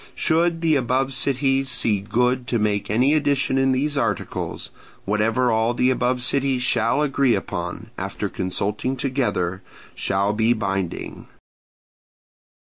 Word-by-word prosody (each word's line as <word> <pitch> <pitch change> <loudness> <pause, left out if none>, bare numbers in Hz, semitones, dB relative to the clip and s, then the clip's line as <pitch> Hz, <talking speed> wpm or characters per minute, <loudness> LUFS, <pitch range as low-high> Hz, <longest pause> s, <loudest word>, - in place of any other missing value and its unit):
Should 165 +1 +1
the 160 -2 +3
above 130 +1 0
cities 135 0 0
see 110 -5 +1
good 125 +5 0
to 120 - 0
make 105 -2 -1
any 125 +7 +3
addition 140 -3 +1
in 135 0 +3
these 145 +3 0
articles, 115 -8 -3 0.3
whatever 110 +5 +1
all 110 +2 +1
the 125 +1 +3
above 125 0 0
cities 135 -1 +1
shall 125 +4 +2
agree 135 -4 +2
upon, - - -5
after - - -3
consulting 105 +7 -2
together, 120 -9 -1 0.3
shall 100 +1 0
be 110 +2 +2
binding. 95 -5 -4
125 Hz, 130 wpm, -22 LUFS, 105-135 Hz, 0.3 s, the